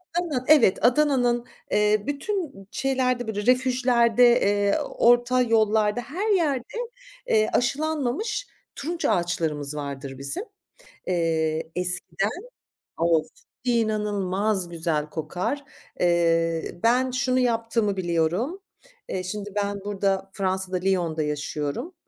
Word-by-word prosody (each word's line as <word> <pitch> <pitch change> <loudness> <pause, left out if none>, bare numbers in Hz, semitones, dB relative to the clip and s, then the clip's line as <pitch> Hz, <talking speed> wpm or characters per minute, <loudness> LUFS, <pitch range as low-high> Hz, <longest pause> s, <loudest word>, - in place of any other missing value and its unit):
Adana'nın, 310 -8 -1
evet, 285 -10 +5
Adana'nın, 245 -3 +3 0.3
eee, 210 0 +3
bütün 290 - -3
şeylerde, 255 -2 0
böyle 205 -1 -3
refüjlerde, 250 -1 +4
eee, 205 0 +2
orta 240 +1 +3
yollarda, 220 -1 +2
her 350 - -3
yerde, 310 - +2 0.6
eee, 215 0 +3
aşılanmamış 310 - -1 0.3
turunç 330 +3 -4
ağaçlarımız 160 -5 0
vardır 140 -2 -6
bizim. 140 - -3 0.6
Eee, 160 -2 0
eskiden 180 +2 0 0.7
Of, 165 -2 +2 0.4
inanılmaz 210 -4 0
güzel 160 -3 -2
kokar. 175 - -3 0.4
Eee, 165 -1 +1
ben 250 +3 +3
şunu 255 0 +1
yaptığımı 230 -4 +1
biliyorum. 180 - -1 0.5
Eee, 185 - -3
şimdi 205 +2 -5
ben 200 0 -1
burada, 195 -1 -1
Fransa'da, 190 -1 -1
Lyon'da 180 -4 0
yaşıyorum. 150 - -3
210 Hz, 100 wpm, -25 LUFS, 175-250 Hz, 0.7 s, evet